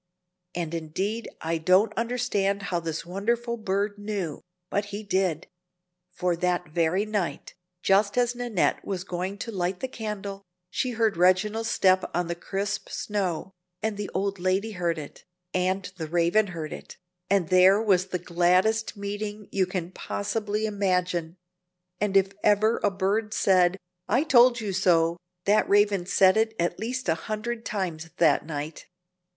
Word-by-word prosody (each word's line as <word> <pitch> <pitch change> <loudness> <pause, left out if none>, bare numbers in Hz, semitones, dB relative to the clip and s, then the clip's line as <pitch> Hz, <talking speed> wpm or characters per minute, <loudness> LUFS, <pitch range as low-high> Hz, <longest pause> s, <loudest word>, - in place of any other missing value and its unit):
And 170 -2 -3
indeed 190 +8 -3
I 165 0 -1
don't 185 +6 +4
understand 225 -4 0
how 180 -3 -1
this 165 -1 -4
wonderful 235 +6 -1
bird 205 -1 -2
knew, 200 -7 -4 0.3
but 205 +1 0
he 205 +1 -6
did; 185 -5 0 0.6
for 180 -1 -1
that 180 -2 0
very 170 +5 +1
night, 200 -9 -3 0.3
just 200 +3 +3
as 245 0 +3
Nannette 240 -6 0
was 190 -3 -3
going 185 +1 -4
to 230 - -5
light 180 -2 -2
the 260 - -2
candle, 210 -5 -5 0.3
she 250 +5 -1
heard 220 -6 +2
Reginald's 210 +5 +3
step 185 0 +4
on 175 0 +1
the 170 - -2
crisp 195 +4 -3
snow, 190 -4 -2 0.3
and 220 -1 0
the 205 0 -4
old 195 0 -2
lady 190 +4 0
heard 175 -4 -1
it, 150 -2 -9 0.3
and 185 +1 0
the 160 -3 -4
Raven 175 +6 +2
heard 165 -4 -5
it, - - -10 0.3
and 195 -4 +2
there 185 +2 +6
was 195 -4 +2
the 185 - -2
gladdest 180 +6 +2
meeting 205 +1 -5
you 190 -2 +1
can 180 -1 -4
possibly 210 +2 -2
imagine; 180 -4 -1 0.6
and 195 -1 +2
if 195 0 +3
ever 215 +2 +3
a 205 - +4
bird 205 +3 -1
said 185 -1 +4 0.3
"I 260 - +3
told 245 -5 +5
you 205 -3 -3
so," 170 -3 +3 0.3
that 210 +2 +3
Raven 200 -3 +3
said 190 +1 +5
it 220 0 +1
at 175 +1 0
least 250 +3 -3
a 165 - +4
hundred 215 +7 -4
times 170 -6 -3
that 170 - +4
night. 150 0 -5
195 Hz, 155 wpm, -26 LUFS, 175-210 Hz, 0.6 s, there